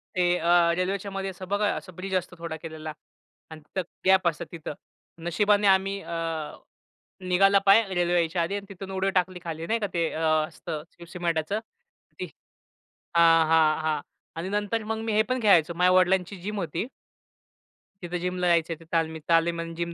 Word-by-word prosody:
ते 180 -1 +3
अ, 170 0 +4
रेल्वेच्यामध्ये 195 +1 -2
असं 185 0 -9
बघा 205 +2 +1
असं 185 -3 -8
ब्रिज 190 +1 -4
असतो 180 0 -2
थोडा 165 -1 -5
केलेला 155 -1 -7 0.6
आणि 155 -1 -9
तिथं 170 +5 -4 0.2
गॅप 190 -1 +5
असतं 165 -3 -1
तिथं. 160 -3 -6 0.5
नशिबाने 205 +4 +3
आम्ही 195 +1 +3
अ, - - -9 1.2
निघाला 195 +2 +5
पाय 200 +3 +7
रेल्वे 175 -1 +1
यायच्या 170 0 +1
आधी 170 +4 -1
आणि 200 0 -5
तिथून 195 0 -8
उडी 190 0 0
टाकली 185 -1 0
खाली 165 -1 -5
नाही 230 +1 +1
का 205 - -1
ते 165 -2 +1
अ, - - -4 0.3
असतं 150 -1 -6 0.2
सिमेंटच 170 -2 -2 0.7
ती - - -2 0.9
हां, 165 -1 +6
हां, 160 -1 +4
हां 155 -1 0 0.4
आणि 165 +3 -4
नंतर 210 +2 -1
मग 220 0 -2
मी 225 - -1
हे 215 +1 +4
पण 255 0 0
खेळायचो 175 -6 +4
माझ्या 180 +2 +4
वडिलांची 185 +1 +3
जिम 210 +3 -4
होती. 175 - -3 1.1
तिथं 175 0 -3
जिमला 180 0 -1
जायचे 165 -1 +2
ते 165 - -15
तालमीत. 160 -1 0
तालीम 170 0 +3
आणि 165 0 -6
जिम 170 0 -3
180 Hz, 170 wpm, -26 LUFS, 165-195 Hz, 1.2 s, पाय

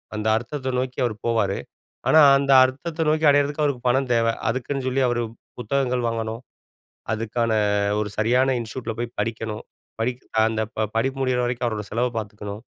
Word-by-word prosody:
அந்த 110 0 -2
அர்த்தத்த 130 +2 -4
நோக்கி 130 0 -3
அவர் 110 -3 -2
போவாரு, 110 -4 +1 0.5
ஆனா 155 0 +7 0.2
அந்த 140 0 0
அர்த்தத்த 155 +5 -4
நோக்கி 155 +1 +2
அடையிறதுக்கு 145 +1 +2
அவருக்கு 135 -4 -1
பணம் 130 +1 +1
தேவ, 115 -1 +2 0.2
அதுக்குன்னு 130 +2 -2
சொல்லி 130 +1 +1
அவரு 120 -1 0 0.4
புத்தகங்கள் 125 0 0
வாங்கணும், 115 0 -3 0.7
அதுக்கான 115 +1 -1 0.5
ஒரு 105 - -3
சரியான 125 +4 +3
இன்ஸ்டிடியூட்ல 115 0 -5
போய் 120 0 -4
படிக்கணும், 110 -2 -3 0.4
படிக்க 125 +2 -2 0.3
அந்த 110 0 -1 0.2
ப 110 -1 +1
படிப்பு 135 +4 0
முடியிற 125 -1 +1
வரைக்கும் 120 0 -1
அவரோட 105 -2 -3
செலவ 120 +3 +1
பார்த்துக்கணும். 105 0 -7
120 Hz, 155 wpm, -23 LUFS, 110-130 Hz, 0.7 s, ஆனா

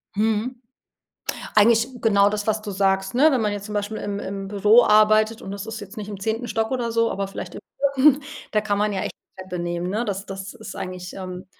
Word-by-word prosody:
Mhm, 225 +4 0 0.9
eigentlich 225 +3 +5
genau 200 -2 +4
das, 210 0 -3
was 220 0 0
du 210 - -5
sagst 195 +1 +1
ne? 295 +6 +6
Wenn 260 - +2
man 210 -2 0
jetzt 205 0 -5
zum 210 - -6
Beispiel 205 +1 -2
im 200 0 -3
im 195 -1 -5
Büro 210 +4 +5
arbeitet 215 +2 +4
und 195 - -7
das 200 +1 -6
ist 225 0 -6
jetzt 205 +2 -10
nicht 210 0 -6
im 200 -2 -6
10. 225 +4 -2
Stock 225 +1 -1
oder 245 -3 -1
so, 230 0 +2
aber 195 0 -2
vielleicht 195 - -7
im - - -7 0.3
4. 285 +1 +5 0.3
da 210 - +3
kann 205 -2 0
man 210 0 +1
ja 190 - -2
echt - - -3
die 190 - -14
Treppe 180 -1 -6
nehmen, 175 +1 -2
ne? 220 +5 -1
Das 200 0 -3
das 195 +2 -7
ist 220 -5 -9
eigentlich 180 0 -6
ähm, 185 -1 -7
210 Hz, 235 wpm, -23 LUFS, 195-225 Hz, 0.9 s, ne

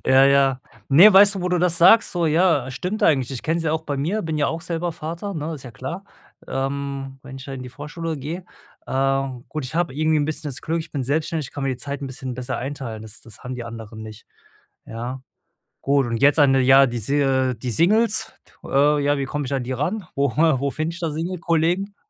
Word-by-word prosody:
Ja, 135 +1 +6
ja. 135 -1 +3 0.3
Ne, 175 +10 +8
weißt 200 +1 +7
du, - - -3
wo 180 - 0
du 180 0 +1
das 175 0 +2
sagst 190 +7 +6
so? 175 -3 0
Ja, 160 -5 +2
stimmt 180 +11 -4
eigentlich. 135 -5 +3
Ich 130 -3 -5
kenne 165 +2 0
es 165 - -4
ja 155 - +1
auch 160 0 -1
bei 145 -2 -3
mir, 180 +10 -1
bin 160 -2 -3
ja 145 - +2
auch 165 - -3
selber 170 +1 -3
Vater, 170 +6 -6
ne? 160 0 -4
Ist 140 - -10
ja 125 - -9
klar. 165 +11 -7 0.4
Ähm, 135 0 -4
wenn 135 0 -10
ich 135 - -10
da 140 - -7
in 130 -1 -6
die 125 - -8
Vorschule 150 +5 -6
gehe 160 +6 -6 0.4
ähm, 135 -1 -1
gut, 155 -3 -4
ich 130 - -10
habe 165 -5 0
irgendwie 155 +2 +2
'n 145 - +1
bisschen 155 0 -4
das 125 -4 -7
Glück, 165 +1 -1
ich 160 - -9
bin 140 - -3
selbstständig, 155 +1 -1
ich - - -18
kann 145 - -5
mir 135 - 0
die 130 - -3
Zeit 140 +2 -6
'n 140 - -4
bisschen 130 0 -6
besser 125 0 -4
einteilen, 130 -5 -5
das 110 0 -9
das 115 -3 -13
haben 125 +1 -6
die 125 - -6
anderen 115 -1 -9
nicht. 110 0 -11 0.6
Ja. 120 +3 -6 0.6
Gut 140 -1 +2
und 115 -1 -2
jetzt 145 +2 +5
an 140 -2 +5
der 135 - +4
ja, 135 +1 +7
die 120 -2 -3
Si 130 +1 +1
die 125 +3 -4
Singles 210 - +2 0.3
äh, 145 +2 +2
ja, 145 +1 +2
wie 135 - -2
komme 145 +1 -3
ich 135 - -4
an 135 -2 -1
die 125 - -5
ran? 175 - -2
Wo 140 -2 +1
wo 140 -3 +2
find 155 +3 -3
ich 170 - -9
da 165 -3 -2
Single-Kollegen? 170 +4 -1
145 Hz, 240 wpm, -22 LUFS, 130-165 Hz, 0.6 s, Ne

